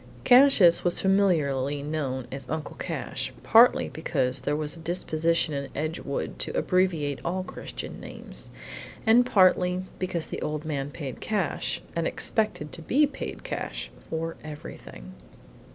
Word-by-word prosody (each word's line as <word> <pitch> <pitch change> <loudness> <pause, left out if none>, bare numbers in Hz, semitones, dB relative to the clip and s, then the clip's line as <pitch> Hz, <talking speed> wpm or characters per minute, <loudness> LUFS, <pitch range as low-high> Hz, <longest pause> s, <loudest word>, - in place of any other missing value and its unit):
Cassius 245 -9 +7
was 175 - +2
familiarly 145 -8 +2
known 140 -4 -3
as 135 -2 -7
Uncle 160 -1 -4
Cash, - - -4
partly 235 +2 +6
because 135 -5 -1
there 145 - 0
was 150 +1 -2
a - - -12
disposition 165 -1 0
in 140 -1 -3
Edgewood 145 - -3
to 65 - -2
abbreviate 165 -7 +1
all 185 +2 -1
Christian - - -7
names, - - -10 0.6
and 240 +2 +5
partly 185 -4 +3
because 180 -3 -2
the - - -6
old 150 +1 -3
man 145 -3 -2
paid 140 -4 -7
cash, 175 -10 -1
and 165 -1 0
expected 210 -9 -1
to 165 - -7
be 280 - +3
paid 290 - -6
cash, - - -4
for 165 0 -4
everything. 105 - -9
160 Hz, 135 wpm, -27 LUFS, 145-185 Hz, 0.6 s, Cassius